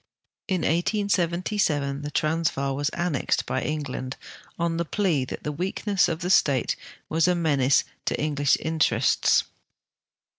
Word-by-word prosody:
In 185 Hz, -3 st, 0 dB
1877 175 Hz, -5 st, 0 dB
the 145 Hz, -, -4 dB
Transvaal 150 Hz, -3 st, 0 dB
was 145 Hz, +1 st, 0 dB
annexed 170 Hz, -6 st, -1 dB
by 130 Hz, -, -1 dB
England 140 Hz, -4 st, -4 dB, 0.4 s
on 170 Hz, -1 st, -1 dB
the 170 Hz, -, -1 dB
])lea 170 Hz, -10 st, +2 dB
that -, -, -7 dB
the 150 Hz, -, -2 dB
weakness 195 Hz, +5 st, 0 dB
of 165 Hz, 0 st, -3 dB
the 180 Hz, +2 st, 0 dB
state 140 Hz, -8 st, +3 dB, 0.3 s
was 160 Hz, +2 st, +2 dB
a 180 Hz, -, +3 dB
menace 140 Hz, -5 st, +3 dB, 0.2 s
to -, -, -1 dB
English 145 Hz, -2 st, +2 dB
in 160 Hz, 0 st, -4 dB
terests. 120 Hz, -4 st, +3 dB
160 Hz, 140 wpm, -25 LUFS, 140-175 Hz, 0.4 s, state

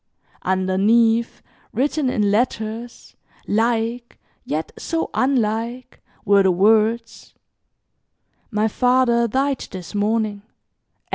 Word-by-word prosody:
Underneath, 215 Hz, +5 st, +1 dB, 0.3 s
written 275 Hz, +3 st, 0 dB
in 210 Hz, -4 st, +1 dB
letters, 225 Hz, +1 st, -3 dB, 0.3 s
like, 230 Hz, +2 st, -1 dB, 0.3 s
yet 155 Hz, +2 st, -3 dB
so 330 Hz, 0 st, -3 dB
unlike, 245 Hz, -1 st, -1 dB, 0.2 s
were 200 Hz, -1 st, +5 dB
the 190 Hz, -, +3 dB
words, 220 Hz, +5 st, +1 dB, 1.1 s
"My 215 Hz, -1 st, +1 dB
father 245 Hz, 0 st, +2 dB
died 270 Hz, +3 st, -1 dB
this 185 Hz, -1 st, -9 dB
morning. 210 Hz, 0 st, 0 dB
225 Hz, 85 wpm, -21 LUFS, 205-245 Hz, 1.1 s, were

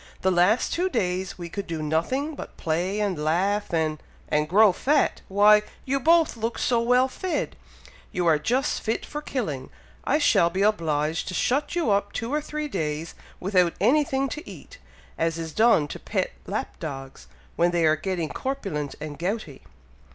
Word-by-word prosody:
"The 190 Hz, -, +2 dB
last 180 Hz, +7 st, +3 dB
two 365 Hz, +2 st, 0 dB
days 185 Hz, -, -1 dB
we 175 Hz, -1 st, -6 dB
could 200 Hz, +4 st, -5 dB
do 160 Hz, -2 st, -3 dB
nothing 255 Hz, -, -1 dB
but -, -, -9 dB
play 175 Hz, +6 st, -1 dB
and 190 Hz, -7 st, -1 dB
laugh, 195 Hz, +7 st, +1 dB
and" 155 Hz, -2 st, 0 dB, 0.3 s
"And 150 Hz, 0 st, +1 dB
grow 210 Hz, +3 st, +6 dB
fat! 285 Hz, +10 st, +1 dB
Why! 210 Hz, +2 st, +6 dB, 0.2 s
you 275 Hz, +1 st, 0 dB
both 330 Hz, +2 st, +4 dB
look 230 Hz, +1 st, -3 dB
so 235 Hz, -2 st, +2 dB
well 250 Hz, +2 st, +4 dB
fed, 360 Hz, +7 st, -3 dB, 0.6 s
you 180 Hz, -1 st, -1 dB
are 160 Hz, -3 st, +4 dB
just 250 Hz, -, 0 dB
fit 225 Hz, -, -2 dB
for 295 Hz, -, -6 dB
killing! 155 Hz, -, -4 dB, 0.3 s
I 290 Hz, -, +2 dB
shall 230 Hz, -, +4 dB
be 190 Hz, +3 st, 0 dB
obliged 160 Hz, -6 st, 0 dB
to 185 Hz, -, -4 dB
shut 285 Hz, +6 st, 0 dB
you 335 Hz, -11 st, +1 dB
up 200 Hz, 0 st, +1 dB
two 230 Hz, +5 st, -3 dB
or 300 Hz, -, +1 dB
three 300 Hz, 0 st, -4 dB
days, 155 Hz, -, -3 dB, 0.3 s
without 180 Hz, -3 st, +2 dB
anything 275 Hz, -1 st, +2 dB
to 310 Hz, +6 st, -7 dB
eat, -, -, -12 dB, 0.4 s
as 165 Hz, 0 st, 0 dB
is 165 Hz, -2 st, -5 dB
done 220 Hz, -9 st, +4 dB
to -, -, -6 dB
pet -, -, -2 dB, 0.2 s
lap -, -, -4 dB
dogs, 135 Hz, -3 st, -7 dB, 0.3 s
when 170 Hz, +1 st, +3 dB
they 170 Hz, -1 st, +1 dB
are 155 Hz, 0 st, +5 dB
getting 170 Hz, 0 st, -3 dB
corpulent 195 Hz, -, -3 dB
and 150 Hz, -1 st, -7 dB
gouty." 200 Hz, +6 st, -3 dB
195 Hz, 175 wpm, -25 LUFS, 160-255 Hz, 0.6 s, grow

